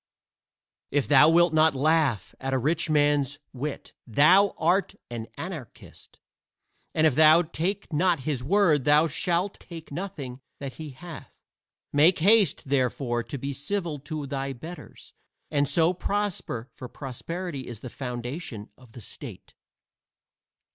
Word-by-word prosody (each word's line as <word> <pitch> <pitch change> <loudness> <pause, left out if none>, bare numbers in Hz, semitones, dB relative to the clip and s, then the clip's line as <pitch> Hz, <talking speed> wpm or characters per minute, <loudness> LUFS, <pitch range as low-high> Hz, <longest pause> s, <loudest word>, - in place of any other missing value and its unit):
If 140 -6 0
thou 145 +4 +7
wilt 170 0 +4
not 155 -2 +4
laugh 145 - +1
at 135 0 -2
a - - +3
rich 155 +6 0
man's 145 -2 +2 0.2
wit 140 +3 -5
thou 175 - +5
art 185 +5 +1 0.2
an 115 -1 -5
anarchist, 160 -8 -9 0.8
and 155 - +3
if 155 - +4
thou 155 +4 +6
take 175 +4 -3
not 170 -1 +2
his 135 -2 -2
word 160 -4 +3
thou 150 +2 +5
shalt 175 +5 -1
take 165 -3 -11
nothing 140 -7 -6 0.2
that 140 -2 -7
he 155 -2 -7
hath. 165 +5 -10 0.6
Make 155 +5 +5
haste, 200 -2 +4
therefore, 130 -2 0
to 120 +4 -6
be 140 +2 -4
civil 155 +2 -3
to 150 +1 -5
thy 135 0 -3
betters, 165 +8 -11 0.4
and 145 -2 +1
so 165 +4 +3
prosper, 185 - -3
for 125 - -9
prosperity 145 +3 -6
is 115 -3 -8
the - - -7
foundation 125 -3 -6
of 125 -3 -18
the 120 - -10
state. - - -10
150 Hz, 140 wpm, -26 LUFS, 130-170 Hz, 0.8 s, thou